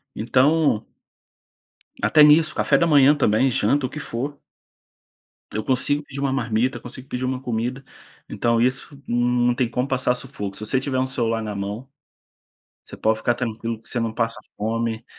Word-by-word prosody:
Então 130 +1 +2 1.2
até 150 - +5
nisso, 155 +1 +6
café - - +3
da 170 - +3
manhã 145 -2 +6
também, 130 -2 +2
janta, 140 +2 +1
o - - -3
que 150 - -7
for. 140 +2 -4 1.2
Eu 110 - -2
consigo 145 +4 0
pedir 140 -1 -8
uma 140 -1 0
marmita, 120 0 0
consigo 125 +2 -10
pedir 125 +1 -4
uma 130 0 -1
comida, 125 +2 -3 0.4
então 115 -1 0
isso 130 +3 -1
não 120 0 +2
tem 120 -1 0
como 125 +3 -1
passar 130 -2 +1
sufoco. 105 -7 -6
Se 110 - -6
você 130 +4 +1
tiver 130 0 -2
um 130 - +1
celular 115 -3 -1
na 105 -2 -5
mão, 100 +6 -5 1.0
você - - -11
pode 110 0 +1
ficar 120 - +1
tranquilo 115 -2 -4
que - - -13
você 120 - -1
não 115 -1 -1
passa 115 0 -2 0.2
fome. 115 +1 -2
125 Hz, 170 wpm, -22 LUFS, 115-135 Hz, 1.2 s, nisso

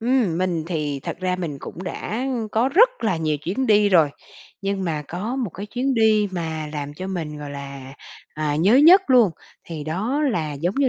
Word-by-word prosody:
ừm, 230 -8 +1
mình 175 -4 -1
thì 150 -5 -2
thật - - -5
ra 185 0 0
mình 165 -6 -4
cũng 175 - -8
đã 215 +7 -4 0.3
có 230 +4 +2
rất 470 - +4
là 190 -6 +1
nhiều 155 -2 0
chuyến 190 - -2
đi 210 -1 +4
rồi 165 -6 +4 0.5
nhưng 195 -1 -2
mà 155 -3 -2
có 210 +9 -4
một 245 -8 -2
cái 200 +5 -7
chuyến 255 +4 -1
đi 215 -2 +3
mà 160 -3 -4
làm 145 -1 -5
cho 185 +4 -6
mình, 160 -6 -4
gọi 145 -1 -7
là, 140 -1 -8 0.4
à, 150 -1 -1
nhớ 195 +9 +4
nhất 345 +7 +8
luôn 240 -7 +6 0.3
thì 155 -3 -7
đó 215 - -1
là, 155 -8 -2
giống 170 +7 -2
như 275 -1 +2
185 Hz, 205 wpm, -22 LUFS, 155-225 Hz, 0.5 s, nhất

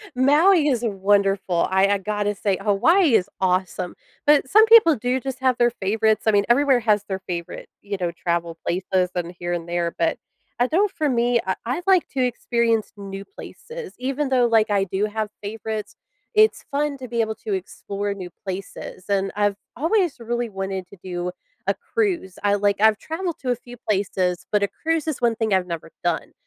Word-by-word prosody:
Maui 300 +5 +5
is 250 -4 +1
wonderful, 195 -3 +1
I 190 +1 +4
I 205 - +2
gotta 205 +1 -1
say- 195 -2 0
Hawaii 275 - +4
is 200 -1 +2
awesome- 185 -1 0 0.3
but 290 -3 +4
some 435 +6 +7
people 440 -9 +7
do 250 +3 -1
just 265 0 -5
have 260 -2 +2
their 240 0 +3
favorites, 220 +1 +1
I 220 - +6
mean, 205 -1 +3
everywhere 265 +1 +4
has 210 -2 +2
their 190 -2 -3
favorite, 170 -1 -5
you 200 -1 -4
know, 175 -2 -1
travel 170 -1 -2
places 185 0 0
and 175 0 -3
here 175 0 -2
and 170 -1 -4
there, 170 -1 -1
but 165 - +1 0.4
I 245 - +3
don't 385 +7 +2
for 310 -6 -1
me, 240 -1 +2
I 190 - 0
I'd 260 +9 -2
like 375 -3 +4
to 260 -2 -1
experience 235 -2 0
new 195 -1 -7
places; 475 -1 -10
even 270 +2 -1
though, 250 -2 +3
like, 225 -1 +3
I 200 -1 +2
do 195 +2 -1
have 215 0 -3
favorites, 215 +1 -5 0.4
it's 430 +1 +4
fun 285 0 -1
to 260 -1 -8
be 235 0 0
able 220 -1 -2
to 210 - -1
explore 200 +2 -4
new 185 -3 -7 0.2
places. 190 -1 -7
And 195 -1 +1
I've 205 -1 +1 0.2
always 340 - +1
really 240 0 -2
wanted 190 -2 -4
to 200 - -15
do 180 -1 -3 0.4
a - - +2
cruise. 365 - -2
I 205 0 +3
like 205 0 +1
I've 220 -1 +5
traveled 335 +4 -4
to 255 -2 -1
a - - +1
few 245 +1 -13
places, 190 -5 -1
but 210 -1 +2
a - - +3
cruise 320 +6 -2
is 310 - -2
one 235 -1 +2
thing 220 -3 0
I've 185 -1 +2
never 165 -1 -6
done, 170 -2 -1
215 Hz, 195 wpm, -23 LUFS, 190-260 Hz, 0.4 s, some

